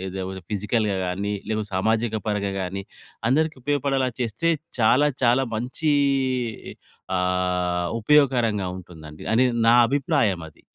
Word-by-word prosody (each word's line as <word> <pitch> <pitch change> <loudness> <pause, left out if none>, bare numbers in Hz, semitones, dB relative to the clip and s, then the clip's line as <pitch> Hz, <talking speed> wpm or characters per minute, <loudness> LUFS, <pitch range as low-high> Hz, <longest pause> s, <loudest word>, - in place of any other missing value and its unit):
లేకపోతే 95 0 -5
ఫిజికల్‌గా 105 0 0
గాని, 100 +3 -2 0.2
లేదా 110 -1 -1
సామాజిక 110 +3 0
పరంగా 100 -2 -1
గాని, 95 +2 -4 0.5
అందరికి 155 +4 +2
ఉపయోగపడేలా 135 -2 0
చేస్తే 120 +8 -1 0.3
చాలా, 130 +6 +4
చాలా 125 +3 +4
మంచి 130 +7 -1 1.3
ఆహ్, 90 -1 0
ఉపయోగకరంగా 120 -7 +3
ఉంటుందండి. 80 -4 -12
అనేది 125 +1 +3
నా 115 - +7
అభిప్రాయం 135 - +1
అది. - - -25
110 Hz, 110 wpm, -24 LUFS, 95-130 Hz, 1.3 s, నా